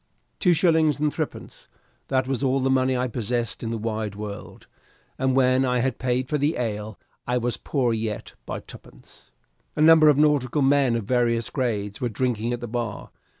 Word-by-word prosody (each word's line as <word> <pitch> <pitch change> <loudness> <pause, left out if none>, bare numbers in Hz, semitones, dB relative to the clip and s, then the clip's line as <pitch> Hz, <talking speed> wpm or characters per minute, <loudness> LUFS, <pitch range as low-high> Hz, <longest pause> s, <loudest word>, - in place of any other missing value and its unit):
Two 180 -3 +4
shillings, 160 -4 +3
and 150 0 0
threepence - - -6 0.4
that 130 -1 0
was 135 0 -2
all 135 0 +2
the 135 0 +1
money 130 -1 +2
I 125 +1 0
possessed 120 0 -3
in 115 - -3
the 115 - -2
wide 110 -2 -3
world, 105 0 -8 0.5
and 130 0 +1
when 130 0 +3
I 125 -1 +1
had 125 0 -1
paid 125 0 -1
for 150 +2 -1
the 145 +4 0
ale, 110 -3 -4 0.3
I 125 0 +1
was 120 0 -1
poorer 125 -5 0
yet 110 -2 -4
by - - -4
twopence. - - -16 0.5
A - - -1
number 160 -1 +7
of 145 - +4
nautical 145 -2 +2
men 135 -3 +3
of 115 - -2
various 115 0 0
grades 110 -5 -2
were 125 - 0
drinking 120 0 -1
at 120 0 -3
the 120 - -5
bar. 115 -2 -4
125 Hz, 190 wpm, -24 LUFS, 115-135 Hz, 0.5 s, number